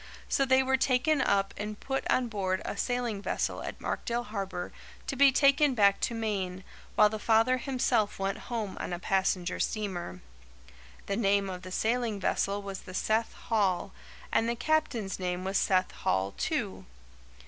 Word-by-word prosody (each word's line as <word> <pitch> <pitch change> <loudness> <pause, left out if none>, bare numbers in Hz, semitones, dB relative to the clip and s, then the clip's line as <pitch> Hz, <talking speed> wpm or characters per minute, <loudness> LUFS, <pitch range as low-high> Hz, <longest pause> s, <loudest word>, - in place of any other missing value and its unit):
So 275 - +2
they 260 0 +4
were 265 0 +2
taken 265 +3 +2
up 195 -3 +1
and 210 0 -5
put 270 0 -3
on 255 -1 +2
board 195 -3 -2
a - - -3
sailing 245 -5 -1
vessel - - -2
at - - -6
Markdale 240 +1 -2
Harbour 195 -5 -4 0.3
to - - -3
be 275 +1 +6
taken 275 0 +4
back 200 -3 +4
to 235 - -1
Maine, 195 -4 -2 0.3
while 210 - +7
the 215 0 -5
father 225 +4 +3
himself 250 -5 0
went 195 0 -2
home 220 -5 -3
on - - -4
a - - -2
passenger 185 -1 0
steamer. 180 - -3 0.8
The 195 - -2
name 200 -3 +2
of 180 -1 -6
the 185 - -9
sailing 225 +1 0
vessel 200 +1 0
was 195 -1 -5
the 185 - -10
Seth 220 +4 0
Hall, 200 -6 0 0.4
and 230 - +2
the 235 - 0
captain's 245 -7 0
name 180 0 -2
was 190 +1 0
Seth 185 -1 +2
Hall, 95 +1 0
too. - - -2
210 Hz, 170 wpm, -29 LUFS, 190-245 Hz, 0.8 s, while